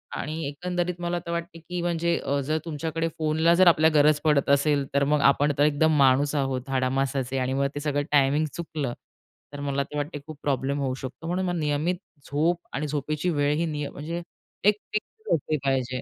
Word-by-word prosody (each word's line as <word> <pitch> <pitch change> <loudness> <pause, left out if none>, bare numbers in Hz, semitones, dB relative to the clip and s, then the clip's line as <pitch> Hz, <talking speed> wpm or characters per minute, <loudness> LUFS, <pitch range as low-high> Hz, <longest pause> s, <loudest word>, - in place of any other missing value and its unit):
आणि 155 +2 -4
एकंदरीत 175 +4 -3
मला 175 0 -1
तर 170 - -4
वाटते, 170 0 -4
की 175 +2 -5
म्हणजे 170 0 0
अ, 140 0 -1
जर 155 +3 0
तुमच्याकडे 165 +1 -2
फोनला 160 +2 +3
जर 185 0 +5
आपल्या 160 -1 +6
गरज 150 0 +5
पडत 150 -3 +2
असेल, 140 0 +3
तर 140 0 +3
मग 145 0 +2
आपण 145 +1 +4
तर 145 - +4
एकदम 150 +1 +3
माणूस 140 +2 +4
आहोत 135 -2 -1
हाडामासाचे 135 0 0
आणि 130 0 0
मग 140 0 +1
ते - - -2
सगळं 145 -1 0
टायमिंग 145 +2 +3
चुकलं, 150 -7 -4 0.6
तर 145 - -6
मला 140 0 0
तर 150 - -7
वाटते 145 +1 -3
खूप 155 -2 -9
प्रॉब्लेम 140 0 0
होऊ 135 -2 -1
शकतो. 140 +5 -7
म्हणून 180 0 -1
नियमित 150 +4 0 0.4
झोप 165 +4 +2
आणि 150 +2 -2
झोपेची 150 +3 -2
वेळ, 145 -3 +1
ही 170 +2 0
निय 150 -2 -3
म्हणजे 165 +4 -5 0.4
एक 210 +1 +5 0.2
फिक्स 435 - -3
असली 155 0 -1
पाहिजे. 130 -1 0
150 Hz, 190 wpm, -26 LUFS, 140-165 Hz, 0.6 s, आपल्या